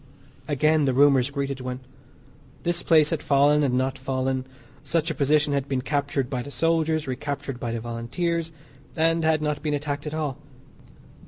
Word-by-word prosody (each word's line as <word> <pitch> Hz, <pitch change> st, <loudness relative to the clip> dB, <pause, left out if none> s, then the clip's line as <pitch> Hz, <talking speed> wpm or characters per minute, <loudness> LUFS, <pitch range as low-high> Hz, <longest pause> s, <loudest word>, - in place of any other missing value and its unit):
Again, 155 Hz, +1 st, +2 dB
the 130 Hz, -2 st, +1 dB
rumours 140 Hz, -2 st, +5 dB
greeted 140 Hz, -2 st, -3 dB
one. 125 Hz, 0 st, -4 dB, 0.8 s
This 175 Hz, 0 st, 0 dB
place 155 Hz, -3 st, +4 dB
had 160 Hz, -3 st, -1 dB
fallen 145 Hz, +1 st, +4 dB
and 150 Hz, -, +2 dB
had -, -, +2 dB
not 130 Hz, +1 st, 0 dB
fallen. 130 Hz, 0 st, -2 dB, 0.4 s
Such 165 Hz, 0 st, 0 dB
a -, -, -1 dB
position 150 Hz, 0 st, +2 dB
had 140 Hz, -1 st, -1 dB
been 130 Hz, -2 st, -1 dB
captured 140 Hz, -2 st, -1 dB
by 125 Hz, -1 st, -3 dB
the 140 Hz, -, -8 dB
soldiers; 160 Hz, +2 st, +1 dB
recaptured 140 Hz, 0 st, -4 dB
by 120 Hz, -, -3 dB
the 115 Hz, -, -2 dB
Volunteers, 150 Hz, +9 st, -2 dB, 0.4 s
and 165 Hz, +1 st, +2 dB
had 160 Hz, -1 st, +2 dB
not 150 Hz, -1 st, -1 dB
been 150 Hz, -1 st, 0 dB
attacked 145 Hz, 0 st, -4 dB
at 150 Hz, -, -4 dB
all. 150 Hz, -4 st, -3 dB
145 Hz, 175 wpm, -25 LUFS, 130-155 Hz, 0.8 s, rumours